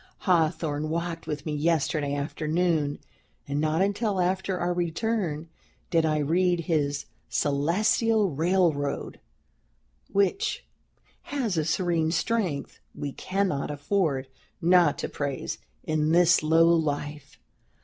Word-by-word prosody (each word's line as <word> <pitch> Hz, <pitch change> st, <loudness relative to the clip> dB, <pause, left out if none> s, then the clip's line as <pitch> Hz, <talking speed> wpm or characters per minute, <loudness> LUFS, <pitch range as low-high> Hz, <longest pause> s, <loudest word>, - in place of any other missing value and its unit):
Hawthorne 155 Hz, -3 st, +1 dB
walked 165 Hz, +1 st, -3 dB
with 150 Hz, -1 st, -4 dB
me 155 Hz, -, -2 dB
yesterday 150 Hz, -1 st, 0 dB
afternoon, 155 Hz, +1 st, 0 dB, 0.5 s
and 140 Hz, +1 st, -1 dB
not 155 Hz, +3 st, +2 dB
until 200 Hz, 0 st, 0 dB
after 185 Hz, +1 st, 0 dB
our 175 Hz, 0 st, 0 dB
return 175 Hz, -2 st, -1 dB, 0.4 s
did 165 Hz, -1 st, +3 dB
I 155 Hz, -1 st, +1 dB
read 175 Hz, +4 st, +2 dB
his 145 Hz, -3 st, -1 dB, 0.2 s
'Celestial 200 Hz, +8 st, +2 dB
Railroad,' 160 Hz, -2 st, 0 dB, 0.9 s
which 200 Hz, -, 0 dB, 0.6 s
has 255 Hz, -9 st, -1 dB
a 155 Hz, -2 st, 0 dB
serene 170 Hz, -2 st, +1 dB
strength 170 Hz, -1 st, -1 dB, 0.2 s
we 145 Hz, -1 st, -4 dB
cannot 185 Hz, -4 st, -1 dB
afford 145 Hz, -2 st, 0 dB, 0.3 s
not 175 Hz, -3 st, +4 dB
to -, -, -3 dB
praise, 140 Hz, -2 st, -4 dB, 0.2 s
in 155 Hz, 0 st, +1 dB
this 175 Hz, 0 st, +5 dB
low 165 Hz, +2 st, +4 dB
life. 150 Hz, -3 st, -1 dB
165 Hz, 110 wpm, -27 LUFS, 150-180 Hz, 0.9 s, this